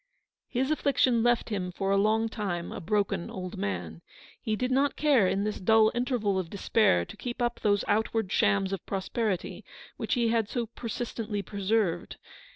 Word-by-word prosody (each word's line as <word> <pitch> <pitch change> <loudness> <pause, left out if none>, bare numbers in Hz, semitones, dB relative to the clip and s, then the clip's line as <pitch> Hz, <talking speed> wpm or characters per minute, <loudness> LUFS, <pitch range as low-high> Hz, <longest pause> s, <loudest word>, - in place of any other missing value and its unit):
His 265 +3 0
affliction 265 -5 +2
left 240 0 +2
him 185 -4 -2
for 195 +2 -2
a - - +4
long 215 +3 +2
time 195 -6 -3
a - - -6
broken 200 -1 0
old 185 -1 -6
man. 85 -4 -4 0.4
He 220 - -1
did 250 +4 -2
not 275 +2 +2
care 275 -10 +4
in 195 +2 0
this 210 0 -2
dull 220 +3 +5
interval 240 -6 0
of 175 -3 -4
despair 200 - +2
to - - -11
keep 245 0 -6
up 240 -1 -1
those 205 -1 +1
outward 220 -1 0
shams 195 -1 +2
of 195 - -4
prosperity 195 0 -2 0.3
which - - -1
he 235 -2 +2
had 225 -2 +1
so 240 -2 -1
persistently 225 -2 -4
preserved. 200 -3 -1
215 Hz, 170 wpm, -28 LUFS, 195-235 Hz, 0.4 s, dull